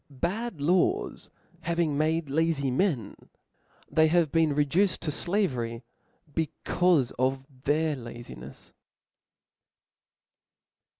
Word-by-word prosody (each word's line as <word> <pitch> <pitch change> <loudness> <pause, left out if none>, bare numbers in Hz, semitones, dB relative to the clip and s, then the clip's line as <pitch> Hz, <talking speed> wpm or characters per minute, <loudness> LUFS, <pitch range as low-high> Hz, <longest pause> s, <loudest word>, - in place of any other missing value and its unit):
Bad 180 - -3
laws 185 - +1 0.3
having 165 -2 0
niade 160 +1 +1
lazy 145 -2 +1
men; 135 - 0 0.7
they 160 0 +4
have 165 -2 +2
been 160 -3 +2
reduced 165 +7 +2
to 150 - -1
flavery, 130 - -1 0.5
becaufe 160 -2 +1
of 130 +1 0 0.2
their 155 +1 +2
lazinels. 120 - -10
155 Hz, 85 wpm, -28 LUFS, 135-170 Hz, 0.7 s, they